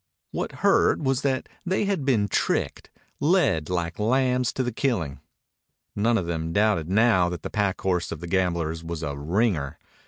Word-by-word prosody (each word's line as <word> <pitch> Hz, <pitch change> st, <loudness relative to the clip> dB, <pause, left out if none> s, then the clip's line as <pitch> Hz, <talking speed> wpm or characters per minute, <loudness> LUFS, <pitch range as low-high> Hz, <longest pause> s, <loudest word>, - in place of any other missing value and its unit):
What -, -, -3 dB
hurt -, -, +4 dB
was 135 Hz, -2 st, 0 dB
that 135 Hz, -2 st, -1 dB, 0.2 s
they 190 Hz, +2 st, 0 dB
had 195 Hz, -8 st, -1 dB
been 110 Hz, -7 st, +2 dB
tricked, -, -, -1 dB, 0.3 s
led 145 Hz, -, +2 dB
like 85 Hz, -1 st, -2 dB
lambs 125 Hz, +2 st, +2 dB
to 130 Hz, -, -1 dB
the 125 Hz, -, -2 dB
killing. 95 Hz, -, -1 dB, 0.8 s
None 115 Hz, +3 st, +2 dB
of 90 Hz, -, -1 dB
them 80 Hz, -1 st, -3 dB
doubted 100 Hz, -4 st, +2 dB
now 100 Hz, -3 st, +4 dB
that 90 Hz, -1 st, -6 dB
the -, -, -5 dB
pack 100 Hz, -3 st, 0 dB
horse 90 Hz, -2 st, 0 dB
of 75 Hz, -, -5 dB
the 85 Hz, -, -7 dB
gamblers 85 Hz, -3 st, -1 dB
was 85 Hz, -1 st, -5 dB
a 70 Hz, -2 st, -3 dB
"ringer." 80 Hz, -, 0 dB
100 Hz, 175 wpm, -25 LUFS, 85-125 Hz, 0.8 s, hurt